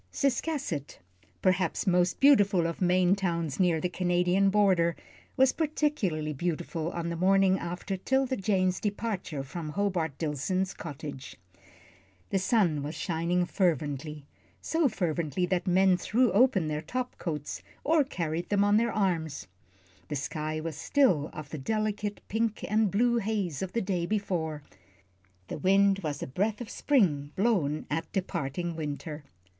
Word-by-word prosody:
Ciscasset, 275 - -1 0.5
perhaps 185 -1 +1
most 180 -2 +2
beautiful 205 -11 +5
of 165 +2 -3
Maine 180 +1 +4
towns 170 -6 -2
near 175 -3 +3
the 180 - 0
Canadian 180 +2 +2
border, 190 -5 +3 0.4
was 265 0 +5
particularly 280 - -1
beautiful 165 +1 -2
on 170 -1 -3
the 170 - -3
morning 190 +2 +3
after 180 +3 -4
'Tilda 265 +7 0
Jane's 185 -3 +1
departure 205 -8 -3
from 155 +3 -6
Hobart 170 -5 -1
Dillson's 170 +5 -1
cottage. 145 -3 -8 1.0
The 195 - +2
sun 185 - +2
was 150 +3 -5
still 175 - -2
shining 175 +2 +1
fervently 150 -5 -1 0.3
so 320 -3 +1
fervently 170 - -1
that 180 0 -1
men 185 0 +4
threw 240 +4 +2
open 200 -5 +3
their 150 0 -2
top 250 +10 -4
coats 150 -4 -4 0.2
or 315 0 +4
carried 170 - -3
them 205 -1 +3
on 205 +1 +4
their 235 +1 +2
arms; 170 -7 -1 0.6
the 150 - -3
sky 155 +2 -3
was 160 -1 -4
still 170 - +2
of 155 -1 -9
the 155 - -5
delicate 210 +4 -2
pink 225 0 -1
and 215 0 +2
blue 235 +5 +2
haze 200 - -2
of 190 -1 -4
the 230 - 0
day 180 -3 -1
before, 170 -8 -2 0.8
the - - -5
wind 195 +1 +4
was 150 -6 -4
a - - -4
breath 205 +10 -1
of 240 -3 -7
spring 155 - +1
blown 185 -9 +1
at 160 +2 -2
departing 175 -2 -3
winter. 150 0 -5
180 Hz, 145 wpm, -29 LUFS, 160-205 Hz, 1.0 s, beautiful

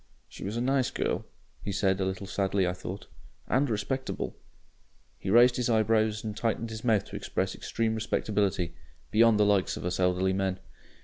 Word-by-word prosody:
"She - - -10
was 105 +4 -3
a - - 0
nice 130 0 +2
girl," - - -2 0.4
he 100 - -4
said 95 -1 +1
a 95 - +1
little 95 +1 -3
sadly, 95 0 0
I 90 - 0
thought. 90 +2 -7 0.4
"AND 135 +3 +2
respectable." 125 +5 -2 0.8
He - - -4
raised 120 +4 +6
his 125 -1 0
eyebrows 110 -1 +2
and 105 -2 -4
tightened 115 0 -1
his 110 0 -6
mouth 110 -5 +2
to - - -8
express - - -2
extreme 115 -1 -1
respectability 100 -5 0 0.4
beyond 115 0 +5
the 105 - +5
likes 100 -2 +2
of - - -6
us 90 +1 -2
elderly 90 +1 +2
men. 95 -1 0
105 Hz, 180 wpm, -29 LUFS, 95-115 Hz, 0.8 s, raised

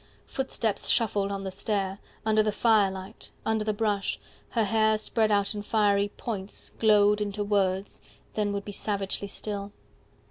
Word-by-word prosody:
Footsteps 240 -5 -1
shuffled 205 -4 +2
on 195 0 -3
the 190 - -4
stair, 195 0 -2 0.3
Under 215 0 +4
the 215 0 +1
firelight, 200 -2 +1 0.2
under 220 -1 +1
the 215 - 0
brush, 205 -2 -1 0.3
her 230 - +1
hair 220 +1 +3
Spread 215 0 +1
out 200 +1 +2
in 205 - -4
fiery 205 -1 +2
points 205 -4 -4
Glowed 210 -1 +5
into 205 0 -2
words, 195 -1 0 0.3
then 210 -1 0
would 200 0 -3
be 205 - -5
savagely 200 -1 -2
still. 200 0 -4
205 Hz, 150 wpm, -27 LUFS, 200-215 Hz, 0.3 s, Glowed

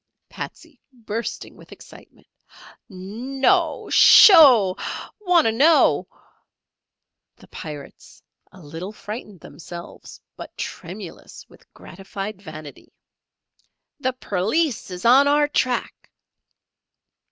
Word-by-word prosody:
Patsey 315 -6 -10
(bursting 230 -2 -7
with - - -18
excitement). - - -16 0.6
"No'o! 265 - -2
Sho'o! 250 - +7 0.4
Wanter 355 - +2
know." 300 +8 +3 1.3
The - - -19
Pirates 150 -3 -11 0.3
(a 185 - -17
little 165 +6 -8
frightened 210 -4 -9
themselves, 170 +1 -12 0.2
but - - -11
tremulous - - -9
with - - -22
gratified 195 +2 -9
vanity). 155 -5 -12 1.1
"The 260 -2 -2
Perleese 240 - -2
is 180 +2 -8
on 265 +4 +5
our 295 +1 +2
track!" 255 -4 -3
225 Hz, 85 wpm, -21 LUFS, 185-285 Hz, 1.3 s, Sho'o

